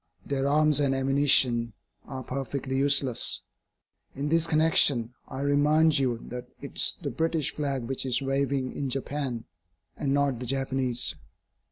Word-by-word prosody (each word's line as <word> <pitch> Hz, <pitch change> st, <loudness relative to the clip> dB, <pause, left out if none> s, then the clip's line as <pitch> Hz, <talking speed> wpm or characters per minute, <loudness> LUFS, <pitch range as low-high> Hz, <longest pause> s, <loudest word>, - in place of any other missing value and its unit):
Their 140 Hz, -1 st, -2 dB
arms 150 Hz, +1 st, +3 dB
and 135 Hz, -2 st, +1 dB
ammunition 135 Hz, -4 st, +3 dB, 0.3 s
are 130 Hz, -1 st, -7 dB
perfectly 135 Hz, 0 st, -4 dB
useless. 135 Hz, -2 st, +3 dB, 0.7 s
In 140 Hz, +2 st, -3 dB
this 165 Hz, +1 st, +2 dB
connection, 155 Hz, -7 st, +3 dB
I 135 Hz, 0 st, -7 dB
remind 145 Hz, +2 st, +3 dB
you 125 Hz, -3 st, 0 dB
that 125 Hz, 0 st, -7 dB
it -, -, -10 dB
is -, -, +3 dB
the -, -, -3 dB
British 160 Hz, -3 st, -1 dB
flag 140 Hz, -4 st, -3 dB
which 130 Hz, +3 st, -3 dB
is 125 Hz, -, +1 dB
waving 135 Hz, -1 st, -2 dB
in 140 Hz, -, -3 dB
Japan, 135 Hz, -2 st, -3 dB, 0.5 s
and 140 Hz, -, -3 dB
not 140 Hz, -3 st, 0 dB
the 125 Hz, -, -6 dB
Japanese. 135 Hz, -1 st, -1 dB
135 Hz, 145 wpm, -26 LUFS, 130-145 Hz, 0.7 s, arms